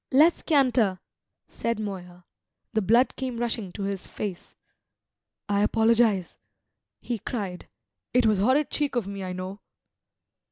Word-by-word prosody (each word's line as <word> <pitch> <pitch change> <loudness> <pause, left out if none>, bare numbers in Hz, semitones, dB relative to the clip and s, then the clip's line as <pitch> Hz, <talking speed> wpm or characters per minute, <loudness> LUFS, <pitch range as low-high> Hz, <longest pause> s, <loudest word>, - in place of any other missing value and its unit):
"Let's 305 +6 +5
canter," 250 - +3 0.5
said 230 -1 -2
Moya. 180 -4 -6 0.5
The 220 - +2
blood 235 +6 +3
came 255 -3 -4
rushing 230 -5 -2
to 200 - -5
his 195 -1 -3
face. 195 -4 -6 0.9
"I 200 -1 +2
apologise," 220 -3 +2 0.6
he 235 -3 -3
cried. 195 -5 -5 0.4
"It 250 -1 +3
was 215 -3 +3
horrid 260 +8 +3
cheek 290 -3 -1
of 240 -5 0
me, 200 0 -5
I 185 -1 -4
know!" 185 +2 -6
215 Hz, 130 wpm, -26 LUFS, 195-240 Hz, 0.9 s, Let's